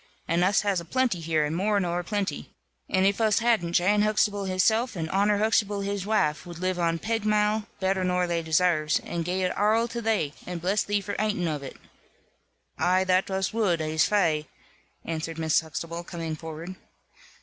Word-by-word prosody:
And 170 Hz, +1 st, +2 dB
us 195 Hz, +2 st, +3 dB
has 200 Hz, -3 st, 0 dB
a 170 Hz, -, -8 dB
plenty 250 Hz, -1 st, 0 dB
here, 160 Hz, -2 st, 0 dB
and 150 Hz, +2 st, -2 dB
more 205 Hz, +3 st, +1 dB
nor 175 Hz, -2 st, -1 dB
a -, -, -4 dB
plenty. 205 Hz, +1 st, -3 dB, 0.4 s
And 190 Hz, 0 st, +2 dB
if 200 Hz, +3 st, +2 dB
us 215 Hz, -2 st, +3 dB
hadn't, 220 Hz, -8 st, +1 dB
Jan 205 Hz, +4 st, +3 dB
Huxtable 210 Hz, -1 st, +1 dB
hisself, 220 Hz, +6 st, +1 dB
and 165 Hz, -3 st, -3 dB
Honor 205 Hz, +2 st, +2 dB
Huxtable 210 Hz, -1 st, +1 dB
his 200 Hz, -1 st, -3 dB
waife, 155 Hz, -9 st, +1 dB
wud 175 Hz, -2 st, -9 dB
live 185 Hz, 0 st, -1 dB
on 165 Hz, -1 st, +1 dB
pegmale 215 Hz, +1 st, 0 dB
(better 190 Hz, 0 st, 0 dB
nor 180 Hz, 0 st, +1 dB
they 170 Hz, -1 st, -1 dB
desarves) 160 Hz, -1 st, +2 dB
and 170 Hz, -1 st, -4 dB
gie 180 Hz, +2 st, -1 dB
it 180 Hz, -, -1 dB
arl 220 Hz, +3 st, +2 dB
to 235 Hz, 0 st, -4 dB
thee, 215 Hz, -10 st, 0 dB
and 180 Hz, -1 st, -4 dB
bless 190 Hz, +5 st, +1 dB
thee 205 Hz, 0 st, 0 dB
for 205 Hz, +1 st, -5 dB
ating 210 Hz, -5 st, 0 dB
of 150 Hz, -3 st, -2 dB
it." 135 Hz, -, -9 dB, 1.0 s
"Ay, 185 Hz, +1 st, +3 dB
that 185 Hz, +1 st, +2 dB
us 190 Hz, +1 st, -1 dB
wud, 200 Hz, -7 st, +1 dB
ees 155 Hz, 0 st, +1 dB
fai," 165 Hz, -7 st, +1 dB, 0.6 s
answered 165 Hz, 0 st, -4 dB
Mrs. 160 Hz, -1 st, +2 dB
Huxtable, 165 Hz, +2 st, -6 dB
coming 165 Hz, -2 st, -5 dB
forward. 160 Hz, +3 st, -8 dB
185 Hz, 190 wpm, -26 LUFS, 165-210 Hz, 1.0 s, us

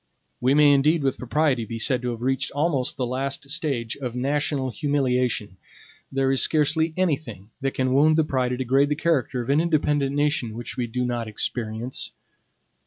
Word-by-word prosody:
We 130 Hz, +3 st, +2 dB
may 150 Hz, -1 st, +6 dB
indeed 150 Hz, +3 st, +3 dB
with 135 Hz, -1 st, 0 dB
propriety 130 Hz, -1 st, +1 dB
be 115 Hz, +1 st, -6 dB
said 125 Hz, +2 st, +1 dB
to 125 Hz, -, -2 dB
have 120 Hz, 0 st, -5 dB
reached 130 Hz, +1 st, 0 dB
almost 145 Hz, -3 st, 0 dB
the 130 Hz, -, -1 dB
last 135 Hz, +3 st, -3 dB
stage 140 Hz, -8 st, -1 dB
of 125 Hz, -3 st, -5 dB
national 135 Hz, 0 st, -1 dB
humiliation. 125 Hz, -, 0 dB, 0.5 s
There 135 Hz, 0 st, +1 dB
is 135 Hz, -, +4 dB
scarcely 160 Hz, +1 st, +2 dB
anything 145 Hz, -, -2 dB
that 135 Hz, 0 st, -2 dB
can 130 Hz, -1 st, 0 dB
wound 155 Hz, +3 st, +4 dB
the 160 Hz, -, +4 dB
pride 130 Hz, -4 st, -1 dB
or -, -, -2 dB
degrade 135 Hz, +3 st, +2 dB
the 150 Hz, -, +1 dB
character 145 Hz, -5 st, 0 dB
of 120 Hz, -, -2 dB
an 145 Hz, +3 st, +4 dB
independent 145 Hz, -4 st, +1 dB
nation 145 Hz, -6 st, 0 dB
which 120 Hz, 0 st, -6 dB
we 120 Hz, -1 st, -2 dB
do 125 Hz, +2 st, -2 dB
not 120 Hz, -2 st, -2 dB
experience. 110 Hz, +2 st, -3 dB
135 Hz, 180 wpm, -24 LUFS, 125-145 Hz, 0.5 s, may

